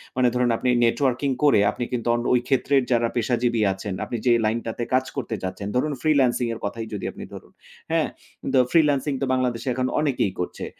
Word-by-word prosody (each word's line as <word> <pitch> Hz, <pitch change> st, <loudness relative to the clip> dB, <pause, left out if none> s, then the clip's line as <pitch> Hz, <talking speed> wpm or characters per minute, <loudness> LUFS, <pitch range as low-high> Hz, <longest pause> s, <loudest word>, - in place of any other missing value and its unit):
মানে 130 Hz, -1 st, +3 dB
ধরুন 125 Hz, 0 st, +1 dB
আপনি 125 Hz, -, -1 dB, 0.2 s
নেটওয়ার্কিং 130 Hz, +2 st, +1 dB
করে 145 Hz, -7 st, +5 dB
আপনি -, -, -5 dB
কিন্তু 120 Hz, -2 st, -2 dB
অন 120 Hz, -, -1 dB
ওই 125 Hz, -, +4 dB
ক্ষেত্রের 135 Hz, 0 st, +2 dB
যারা 120 Hz, -1 st, +3 dB
পেশাজীবী 120 Hz, -1 st, 0 dB
আছেন, 95 Hz, +1 st, -6 dB
আপনি 120 Hz, -, -4 dB
যে 125 Hz, -, +4 dB
লাইনটাতে 115 Hz, +1 st, -2 dB
কাজ 130 Hz, 0 st, +3 dB
করতে 120 Hz, -4 st, -3 dB
চাচ্ছেন, 95 Hz, +2 st, -4 dB
ধরুন 145 Hz, +4 st, +1 dB
ফ্রিল্যান্সিং 135 Hz, -5 st, +2 dB
এর 115 Hz, -, -7 dB
কথাই 110 Hz, +2 st, -4 dB
যদি 100 Hz, -, -4 dB
আপনি -, -, -9 dB
ধরুন। -, -, -11 dB, 0.4 s
হ্যাঁ? -, -, +2 dB, 0.5 s
তো 130 Hz, -, +5 dB
ফ্রিল্যান্সিং 145 Hz, -3 st, +3 dB
তো -, -, +1 dB
বাংলাদেশে 130 Hz, 0 st, -1 dB
এখন 130 Hz, 0 st, 0 dB
অনেকেই 135 Hz, -9 st, 0 dB
করছে। 90 Hz, -, -4 dB
125 Hz, 190 wpm, -23 LUFS, 115-135 Hz, 0.5 s, করে